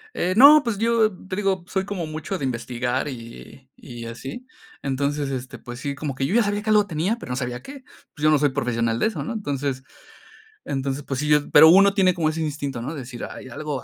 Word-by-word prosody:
Eh, 185 +2 0
no, 295 +4 +9
pues 230 -4 -2
yo, 225 0 +2 0.2
te 185 - -4
digo, 195 -3 0
soy 190 -1 -2
como 195 -5 -4
mucho 155 +5 -5
de 140 - -3
investigar 125 +2 -2
y 125 +1 -10
y 120 -3 -10
así. 135 - -8 0.4
Entonces, 140 +1 -1
este, 130 -1 -5
pues 120 0 -9
sí, 140 0 -4
como 140 -1 -4
que 135 +1 -2
yo 195 - -1
ya 240 - +5
sabía 205 0 -1
que 215 - -4
algo 210 -1 +5
tenía, 185 +6 -1
pero 125 - -8
no - - -1
sabía 125 -1 -4
qué. 275 -1 -10 0.3
Pues 150 - -10
yo 155 - +5
no 155 - +5
soy 145 0 +2
profesional 115 -4 -1
de - - +2
eso, 220 - -4
¿no? 240 - -4
Entonces 140 - -3 0.8
entonces, 135 0 -3
pues 135 -3 -4
sí, 150 - -2
yo 150 -1 +3
pero 160 +2 +9
uno 195 +3 +6
tiene 185 -2 +4
como 165 -3 0
ese 160 +1 -3
instinto, 140 -5 -3
¿no?, 145 +6 -4
de 150 - -6
decir: 120 -1 -7
"Ay, - - -10
algo 145 +1 -5
150 Hz, 235 wpm, -23 LUFS, 130-195 Hz, 0.8 s, no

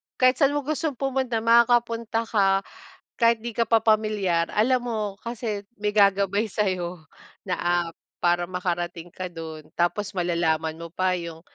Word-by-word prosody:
kahit 255 0 +3
saan 280 +1 +3
mo 290 - -1
gustong 310 0 -2
pumunta, 260 -3 -1
makakapunta 230 -1 +3
ka. 195 -3 +2 0.5
Kahit 230 -1 +3
'di 235 0 -6
ka 230 - +3
pa 225 0 +3
pamilyar, 210 -6 +1
alam 245 +3 +2
mo 210 -4 -3
kasi 220 -3 -4 0.2
may 210 - +1
gagabay 200 0 +3
sayo 180 -5 -2 0.3
na 185 -2 -3 0.3
app 165 - -18 0.2
para 175 0 +2
makarating 175 -1 -3
ka 185 - -6
do'n 160 -3 -8
tapos 205 +4 -1
malalaman 165 -3 0
mo 170 0 -8
pa 185 0 +1
yung 170 -1 -7
205 Hz, 150 wpm, -25 LUFS, 175-230 Hz, 0.5 s, kahit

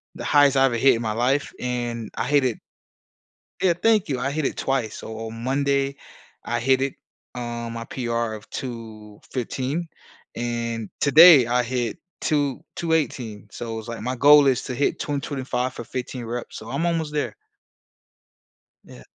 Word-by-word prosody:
the - - -7
highest 145 -2 +5
I 135 - +6
ever 125 -3 +1
hit 135 +2 +5
in 115 - -3
my 110 -2 -1
life, 130 +5 0
and 120 -2 -3
I - - -1
hit 145 -1 +3
it 120 -4 0 1.0
Yeah. 185 -2 +4
Thank 215 +4 +2
you. 130 -3 -1
I 135 +3 -1
hit 155 0 -1
it - - -2
twice. 130 -5 -1
So 110 - -7
on 115 +1 -8
Monday, 140 +1 +1 0.5
I 120 0 -1
hit 130 +2 +3
it, 135 0 -1 0.4
um, 120 -1 -4
my 115 0 -5
PR 115 -3 -2
of 110 0 -10
215, 120 +6 -5 0.5
and 115 -2 -3
today, 150 -2 +9
I 125 +1 +2
hit 120 -2 -2 0.2
two 145 -4 0
218. 130 -11 -1
So 115 +2 -6
it - - -4
was, 110 +1 -7
like, 115 - -5
my 125 +3 -2
goal 145 +2 +7
is 130 -3 +2
to 130 - -5
hit 140 - 0
225 130 -3 -2
for - - -7
15 125 0 -5
reps. 120 +1 -5
So 110 - -9
I'm 140 +5 -1
almost 165 -3 -1
there. 150 - -2 1.5
Yeah. - - -13
125 Hz, 170 wpm, -24 LUFS, 115-140 Hz, 1.5 s, today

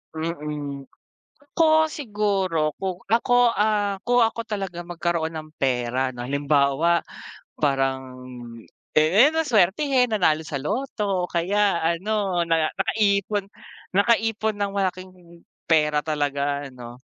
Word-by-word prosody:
Mm. 150 -4 -5 0.7
Ako 315 -1 +4
siguro, 195 - -1
kung 185 -2 -3
ako, 235 +2 +3
ah, 205 -2 0
kung 245 -1 +3
ako 225 +1 -2
talaga 195 -5 -4
magkaroon 170 -1 -2
ng 155 0 -7
pera 130 0 0
no 120 0 -6
halimbawa, 140 +4 +1 0.6
parang, 130 -2 -1 0.7
eh 185 - +6
na 320 - +2
swertehen, 250 - +2
nanalo 160 -6 +2
sa 140 - -3
lotto, 205 - -2
o - - -25
kaya 195 +2 +1
ano, 185 +1 0
na 160 -1 +2
nakaipon 200 0 0 0.5
nakaipon 220 +1 +2
ng 200 -1 0
malaking 185 -1 -2 0.6
pera 150 -2 +3
talaga 145 -2 -1
ano. 125 0 -11
175 Hz, 110 wpm, -23 LUFS, 150-210 Hz, 0.7 s, eh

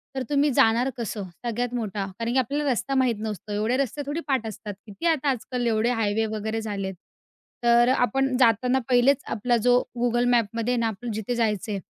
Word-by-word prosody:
तर, 265 - -1
तुम्ही 290 0 +3
जाणार 235 +3 +4
कसं? 215 -3 -4 0.2
सगळ्यात 240 +1 -2
मोठा. 210 -4 -2
कारण 230 0 -1
की 265 - +1
आपल्याला 280 +3 0
रस्ता 270 +3 -1
माहीत 255 -3 +2
नसतो, 215 -2 -5
एवढे 215 +4 0
रस्ते 275 +1 -1
थोडी 290 +3 -3
पाठ 265 -5 0
असतात, 210 -1 -7
किती 205 +10 -8
आता 300 -4 +2
आजकाल 250 -1 -2
एवढे 225 +1 +2
हायवे 215 +1 +1
वगैरे 220 +1 -3
झालेत. 200 -3 -4 0.7
तर 240 +1 +5
अ, - - +4
आपण 270 +1 +1
जाताना 250 +2 +3
पहिलेच, 255 +2 +4
आपला 240 +2 +1
जो 245 0 +6 0.2
Google 240 0 +2
Mapमध्ये 230 +2 0
आहे 245 - 0
ना, 230 - +1
आपलं 225 +2 -5
जिथे 220 +3 -3
जायचं 215 -2 0
आहे 200 - -2
235 Hz, 195 wpm, -25 LUFS, 220-255 Hz, 0.7 s, जो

